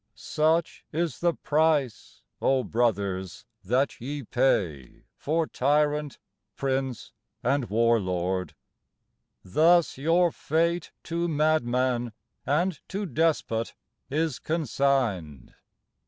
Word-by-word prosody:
Such 160 +2 0
is 165 -4 -2
the 170 -1 +1
price, 150 -6 0 0.2
O 135 -1 +2
brothers, 100 -6 -1 0.2
that 125 +8 0
ye 140 +3 -4
pay 95 - 0
For 160 +2 0
tyrant, 150 +1 +1 0.4
prince 135 -2 -2 0.3
and 140 -3 +1
war 115 +2 +3
lord; 90 -2 -2 0.9
thus 160 - +3
your 170 +4 +3
fate 170 +3 0
To 170 +1 -2
madman 130 -6 +1 0.3
and 170 +3 +1
to 200 +2 -3
despot 150 -7 0 0.3
is 155 -1 -1
consigned. 125 - -1
140 Hz, 95 wpm, -27 LUFS, 115-160 Hz, 0.9 s, war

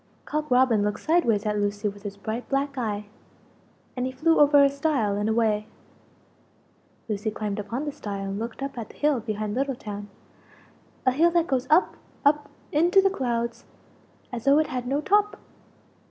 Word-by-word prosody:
Cock 305 0 -3
Robin 250 -4 +4
looked 210 0 -2
sideways 235 -11 +2
at 210 -1 0
Lucie 205 +1 -1
with 205 0 -6
his 200 -1 -7
bright 220 +4 -5
black 275 +1 0
eye, 210 -5 -2 0.9
and 250 0 -1
he - - -4
flew 325 +6 +2
over 290 -1 +7
a - - +7
stile 280 -7 0
and 205 +1 -1
away. 220 -2 +1 1.4
Lucie 210 0 -2
climbed 210 -1 -4
upon 230 +8 -4
the 295 - -2
stile 200 -7 -5
and 195 +1 -3
looked 230 +4 -5
up 275 -3 -5
at 225 - -6
the - - -15
hill 295 -3 +2
behind 215 -2 -3
Little 270 +2 -1
town 205 -3 -7 1.0
a 255 - +5
hill 320 +7 +4
that 340 -1 +2
goes 260 -5 -1
up 315 +4 +3 0.3
up 295 +1 +3 0.2
into 345 +6 +4
the 390 0 +4
clouds 235 -6 -2 0.7
as 240 -2 -6
though 275 +1 +6
it 310 - +3
had 250 -2 -4
no 280 +3 0
top! 410 +4 +2
250 Hz, 180 wpm, -25 LUFS, 210-290 Hz, 1.4 s, over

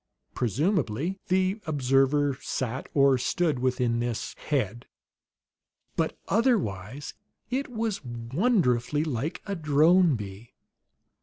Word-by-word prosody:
Presumably, 150 - 0
the 190 +2 +1
observer 140 0 +2
sat 130 0 -3
or 140 -2 +5
stood 155 +2 0
within 125 -2 +1
this 120 -1 -3
"head." 120 -5 -1 1.1
But - - -1
otherwise 145 - 0 0.4
it 270 +3 -1
was 220 -6 -2
wonderfully 125 - +1
like 150 0 -3
a 200 - -3
drone 160 +1 +4
bee. 105 +1 -8
140 Hz, 95 wpm, -27 LUFS, 120-180 Hz, 1.1 s, or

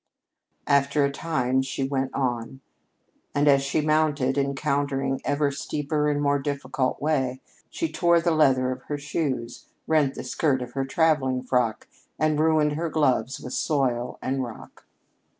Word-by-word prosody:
After 140 0 +3
a 140 - -1
time 130 -4 0
she 135 0 -2
went 135 -1 -1
on, 125 0 -2 0.7
and 145 +1 +2
as 140 -1 +6
she 140 +3 0
mounted, 150 -3 +1
encountering 140 -1 -1
ever 145 0 +1
a - - -6
steeper 150 +1 -1
and 145 0 0
more 145 -1 +2
difficult 135 -2 -2
way, 135 -4 0 0.3
she 330 - -2
tore 170 -1 +3
the 170 0 +1
leather 130 -5 +3
of 130 0 -5
her 145 - -2
shoes, 140 -5 -3 0.2
rent 150 -4 +2
the - - -6
skirt 130 0 0
of 125 - -9
her 135 +1 -2
traveling 135 -4 +1
frock, 125 -4 0 0.3
and 155 -1 +1
ruined 155 -1 +3
her 160 +3 -2
gloves 135 -4 +1
with 125 - -7
soil 125 -5 0
and 135 0 -1
rock. 120 -3 -10
140 Hz, 155 wpm, -25 LUFS, 130-150 Hz, 0.7 s, as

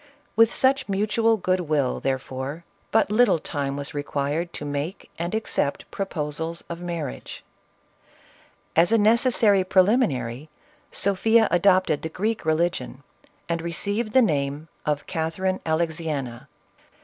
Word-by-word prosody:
With 225 0 +5
such 265 -3 +2
mutual 215 +3 +2
good 185 -1 0
will, 150 -6 0
therefore, 135 +4 -3 0.2
but 220 -2 +2
little 215 -4 +4
time 140 -2 -3
was 140 0 -4
required 145 +3 -2
to 145 - -6
make 145 +6 -4
and 170 +5 -2
accept 185 -9 -1
proposals 165 -3 -3
of 170 0 -6
marriage. 170 -6 -5 1.3
As 170 +4 +4
a 230 - +5
necessary 220 -2 +4
prelimi 200 +7 +4
nary, 125 +2 -5 0.4
Sophia 220 +4 +3
adopted 185 -4 +3
the 160 - -4
Greek 210 +3 -2
religion, 155 -4 -1 0.4
and 170 -1 -1
received 200 +7 -2
the 260 - +6
name 145 -3 -1 0.2
of 150 -1 0
Catherine 185 +4 -2
Alexiena. 155 -6 -2
170 Hz, 125 wpm, -24 LUFS, 145-200 Hz, 1.3 s, the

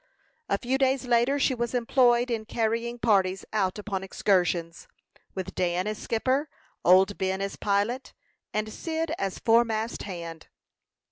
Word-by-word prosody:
A - - +2
few 260 +2 -1
days 265 0 +2
later, 245 +3 +3
she 275 -1 +2
was 240 0 -2
employed 245 0 +3
in 220 -2 -2
carrying 230 +2 -1
parties 195 -5 +2
out 195 -3 0
upon 200 -2 -4
excursions, 175 -3 0 0.5
with 190 -2 -5
Dan 180 0 0
as 215 0 -3
skipper, 260 +6 0 0.3
old 190 +3 +5
Ben 190 0 0
as 195 0 -3
pilot, 210 +6 -1 0.4
and 215 0 -2
Cyd 325 -1 -3
as 195 -1 -2
foremast 230 -1 +2
hand. 170 -4 -7
220 Hz, 140 wpm, -27 LUFS, 190-240 Hz, 0.5 s, old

